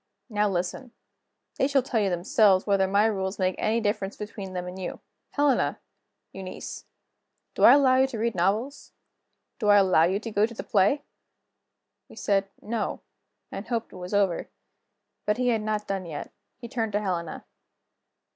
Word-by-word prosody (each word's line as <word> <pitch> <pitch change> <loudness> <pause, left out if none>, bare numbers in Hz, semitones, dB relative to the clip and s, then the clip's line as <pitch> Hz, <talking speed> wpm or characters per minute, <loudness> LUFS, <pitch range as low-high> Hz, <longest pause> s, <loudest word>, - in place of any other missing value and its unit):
Now 210 -1 +2
listen. 190 +7 -3 0.7
They 270 - +3
shall 280 -2 +2
tell 245 -3 0
you 200 -2 +2
themselves 185 +2 +3
whether 195 -2 +2
my 200 +2 +3
rules 190 -3 -1
make 185 0 +1
any 225 +2 +1
difference 205 -2 -2
between 200 -2 -7
them 180 0 -4
and 180 +1 -7
you. 185 - -5 0.3
Helena! 285 -3 +2 0.5
Eunice! 190 -1 -7 0.7
do - - +4
I - - +10
allow 265 -2 +5
you 265 +1 +4
to 255 -4 -6
read 230 +1 0
novels? 210 +10 -1 0.7
do 210 - -1
I 205 - +8
allow 185 -5 +5
you 190 +3 0
to 225 +1 -6
go 210 +1 +3
to 235 - -11
the - - -5
play?" 210 +9 +2 1.1
We - - -14
said, 195 -1 0
"No" 225 0 -3 0.5
and 195 - -6
hoped 230 -2 -3
it - - -10
was 180 +2 -4
over. 195 -4 +1 0.8
But 210 - +2
he 250 0 +1
had 225 -2 +1
not 215 -1 -2
done 195 -3 -3
yet. 150 -3 -6 0.3
He 240 - -8
turned 225 -3 -2
to 205 - +2
Helena. 175 -5 -3
205 Hz, 175 wpm, -26 LUFS, 190-230 Hz, 1.1 s, I